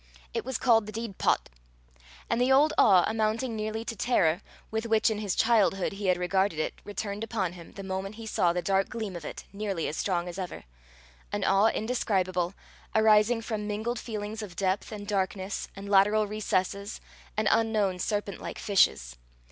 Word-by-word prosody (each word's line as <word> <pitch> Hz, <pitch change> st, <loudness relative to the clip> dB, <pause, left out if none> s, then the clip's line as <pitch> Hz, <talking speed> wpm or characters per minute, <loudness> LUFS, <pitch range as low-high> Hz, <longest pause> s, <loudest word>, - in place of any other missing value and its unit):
It -, -, -1 dB
was 260 Hz, -1 st, -2 dB
called 225 Hz, -4 st, +3 dB
the -, -, -5 dB
Deid 220 Hz, -2 st, -6 dB
Pot; -, -, +2 dB, 0.8 s
and 230 Hz, +1 st, 0 dB
the 255 Hz, +2 st, +3 dB
old 290 Hz, +4 st, +5 dB
awe, 185 Hz, -5 st, +6 dB
amounting 220 Hz, +2 st, 0 dB
nearly 215 Hz, +1 st, -3 dB
to 230 Hz, -, -4 dB
terror, 180 Hz, -8 st, +2 dB, 0.3 s
with 220 Hz, +1 st, -2 dB
which 220 Hz, 0 st, +3 dB
in 210 Hz, -, -2 dB
his 205 Hz, -4 st, -1 dB
childhood 210 Hz, -5 st, +3 dB
he 195 Hz, 0 st, -4 dB
had 180 Hz, -1 st, +3 dB
regarded 190 Hz, -1 st, +1 dB
it, 155 Hz, -, -1 dB
returned 205 Hz, 0 st, -4 dB
upon 200 Hz, -6 st, -2 dB
him, 170 Hz, -2 st, -12 dB
the 195 Hz, -, -8 dB
moment 190 Hz, +2 st, -4 dB
he 225 Hz, 0 st, -8 dB
saw 180 Hz, -5 st, +2 dB
the 175 Hz, 0 st, -2 dB
dark 195 Hz, 0 st, +1 dB
gleam 220 Hz, -5 st, -4 dB
of 170 Hz, -3 st, -7 dB
it, -, -, -7 dB
nearly 200 Hz, -5 st, -2 dB
as 150 Hz, -, -3 dB
strong 175 Hz, -2 st, -1 dB
as 175 Hz, +2 st, -6 dB
ever 185 Hz, -2 st, -5 dB, 0.7 s
an -, -, -2 dB
awe 195 Hz, +3 st, +4 dB
indescribable, 190 Hz, -6 st, 0 dB, 0.4 s
arising 220 Hz, +1 st, +4 dB
from 215 Hz, -2 st, -3 dB
mingled 220 Hz, +3 st, -2 dB
feelings 215 Hz, -1 st, -5 dB
of 195 Hz, -5 st, -8 dB
depth, 190 Hz, +3 st, -1 dB
and 205 Hz, -1 st, -7 dB
darkness, 195 Hz, -1 st, -2 dB
and 195 Hz, +1 st, -8 dB
lateral 205 Hz, +2 st, +4 dB
recesses, 200 Hz, -1 st, -2 dB, 0.4 s
and 215 Hz, 0 st, +1 dB
unknown 215 Hz, -5 st, +2 dB
serpent 205 Hz, -1 st, -2 dB
like -, -, -6 dB
fishes. 60 Hz, -, +2 dB
205 Hz, 180 wpm, -28 LUFS, 190-220 Hz, 0.8 s, awe